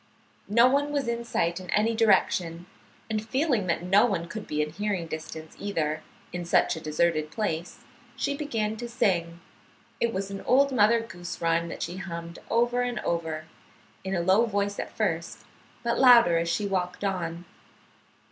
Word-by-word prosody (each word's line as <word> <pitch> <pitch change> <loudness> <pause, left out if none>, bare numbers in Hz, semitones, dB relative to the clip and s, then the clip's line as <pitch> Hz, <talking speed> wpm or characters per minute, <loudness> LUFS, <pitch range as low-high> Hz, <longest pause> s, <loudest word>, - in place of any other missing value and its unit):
No 235 +4 +6
one 285 +2 +1
was 285 -4 -1
in 235 0 -1
sight 170 -6 -1
in 185 -1 -11
any 220 +2 +2
direction, 175 -6 +2 0.4
and 215 -1 -2
feeling 250 - 0
that 170 0 0
no 195 +4 +5
one 175 -6 -2
could 215 +4 -7
be 150 - -2
in 150 - -5
hearing 195 0 -2
distance, 160 0 -7
either, 155 -6 -2 0.3
in 180 0 -3
such 170 - +2
a 160 - -7
deserted 155 0 0
place, 175 -4 -3 0.3
she 280 0 -1
began 225 -8 -2
to 240 +1 -6
sing. 170 -7 0 0.6
It 235 - +1
was 195 -1 -3
an 195 - -5
old 275 +2 +3
Mother 230 -1 +4
Goose 175 -6 -8
rhyme 165 0 +1
that - - -5
she 175 - -5
hummed 170 -3 -6
over 240 +1 +2
and 245 -1 -2
over, 160 -2 -2 0.6
in 190 0 -2
a 175 - +1
low 190 +7 +4
voice 205 -1 -1
at - - -4
first, - - -2 0.4
but 235 0 0
louder 235 -10 +7
as 170 0 -1
she 205 +4 0
walked 185 -1 -2
on. 175 -3 -2
195 Hz, 175 wpm, -27 LUFS, 170-230 Hz, 0.6 s, louder